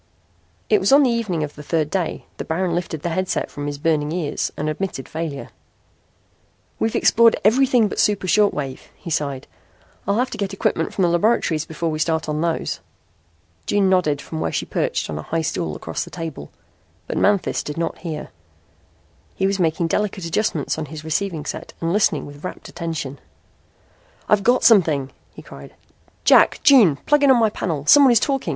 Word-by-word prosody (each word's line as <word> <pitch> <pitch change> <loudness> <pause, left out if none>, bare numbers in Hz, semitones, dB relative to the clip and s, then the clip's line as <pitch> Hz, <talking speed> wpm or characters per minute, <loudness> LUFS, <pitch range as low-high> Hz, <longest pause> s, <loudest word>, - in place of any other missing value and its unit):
It 425 - +4
was - - +1
on 280 +1 +7
the 255 - +3
evening 210 -9 -1
of 150 -1 -5
the 150 - -11
third 155 0 -1
day 180 -4 -2
that - - -6
Baron 170 +2 -1
lifted 165 -3 -3
the 175 - -1
headset 185 +2 -2
from 145 0 -5
his 145 -1 -4
burning 150 0 0
ears 165 -4 -2
and 150 - -2
admitted 155 -3 -4
failure. 160 -3 -5 1.3
"We've 225 - 0
explored 230 0 +5
everything 245 0 +4
but - - -5
the - - +6
super 205 -3 +1
short 205 +3 +4
waves," 135 -3 -5
he 170 - -9
sighed. 140 -3 -2 0.6
"I'll 200 +1 +1
have 250 +2 0
to - - -7
get 200 -1 -2
equipment 195 - -1
from 190 - -1
the - - +4
laboratories 170 -3 +1
before 160 +1 -3
we 155 - -3
start 160 0 0
on 150 0 -2
those." 165 -1 -2 0.9
June 200 -2 +2
nodded 155 -6 +1
from 160 - -6
where - - -1
she - - -2
perched - - -2
on 75 -1 -5
a - - -10
high 165 0 0
stool 80 - -2
across 80 - -4
the - - -11
table. 160 - -7 0.6
But - - -3
Manthis 200 -2 +1
did 150 - -7
not 165 - -3
hear. 160 -4 -6 1.1
He 190 - 0
was 195 0 0
making 165 0 +1
delicate 195 +1 -1
adjustments 165 -4 -1
on 155 - -3
his 155 +1 -9
receiving 160 -1 -2
set - - -6
and 165 +1 -1
listening 205 0 +1
with 145 +1 -12
rapt 185 - -7
attention. 160 -5 -5 1.1
"I've 210 -1 +3
got 245 +5 +2
something," 160 - +4 0.2
he - - -11
cried. - - -12 0.5
"Jack. - - +5
June. 245 - +6
Plug 295 -1 +3
in 285 - +4
on 260 - +6
my 220 -2 +3
panel. 155 -8 -3
Someone 280 - +7
is 235 - +5
talking. 270 +2 -1
170 Hz, 190 wpm, -21 LUFS, 150-205 Hz, 1.3 s, on